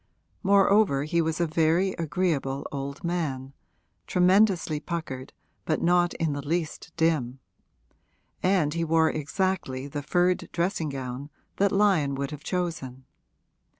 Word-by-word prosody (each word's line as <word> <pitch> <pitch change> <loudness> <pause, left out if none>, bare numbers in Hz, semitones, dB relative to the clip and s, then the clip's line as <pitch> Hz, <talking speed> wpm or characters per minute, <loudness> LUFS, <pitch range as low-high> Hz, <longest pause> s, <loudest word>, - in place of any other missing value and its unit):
Moreover 200 -6 +4
he 170 +3 +1
was 160 0 -1
a 170 - +3
very 165 +4 +2
agreeable 150 -4 -1
old 140 +2 -5
man, 145 -6 -2 0.5
tremendously 180 -3 +3
puckered 150 -6 -5 0.3
but - - 0
not 175 0 +2
in 160 -3 -1
the 145 - -4
least 160 +2 -3
dim; 155 -6 +1 1.0
and 180 -6 +2
he 170 0 -1
wore 160 0 +3
exactly 155 -4 -2
the 145 +1 -4
furred 175 +5 +1
dressing 170 -2 -1
gown 135 +1 -5 0.3
that 200 0 +3
Lyon 190 -9 +3
would 140 +1 -3
have 150 0 -8
chosen. 155 -9 -3
160 Hz, 125 wpm, -26 LUFS, 140-180 Hz, 1.0 s, Moreover